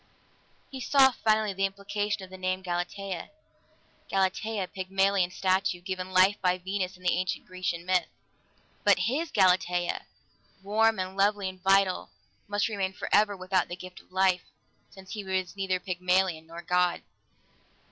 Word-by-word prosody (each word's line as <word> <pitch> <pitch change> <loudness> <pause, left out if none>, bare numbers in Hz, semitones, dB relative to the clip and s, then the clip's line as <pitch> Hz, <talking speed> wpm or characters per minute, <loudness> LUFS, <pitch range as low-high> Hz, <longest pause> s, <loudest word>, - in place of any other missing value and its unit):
He 265 -1 -6
saw 265 +1 +5
finally 215 -3 +1
the 195 +1 +1
implication 205 +1 -3
of 185 - -11
the 190 - -8
name 185 0 -1
Galatea. 180 +1 -4 0.8
Galatea 195 +1 0
Pygmalion's 190 0 +1
statue, 185 -1 +1
given 185 +1 -5
life 185 +2 +4
by 180 -1 +2
Venus 190 0 -3
in 180 - -20
the 180 - +2
ancient 185 +1 -2
Grecian 185 -2 -4
myth. 185 -1 +2 0.8
But - - +5
his 300 +7 0
Galatea, 180 -2 +2 0.6
warm 220 +2 +3
and 185 0 -4
lovely 200 0 +2
and 185 0 -8
vital, 195 -1 +3 0.4
must 205 0 0
remain 195 -4 -2
forever 205 +1 +2
without 185 -1 0
the 175 - -5
gift 185 0 -11
of - - -30
life, 185 -1 +3 0.5
since 190 -1 -13
he 210 -2 -5
was 190 -1 -2
neither 190 -2 -1
Pygmalion 180 -2 0
nor 170 +1 -9
God. 180 -2 +1
190 Hz, 145 wpm, -28 LUFS, 185-200 Hz, 0.8 s, saw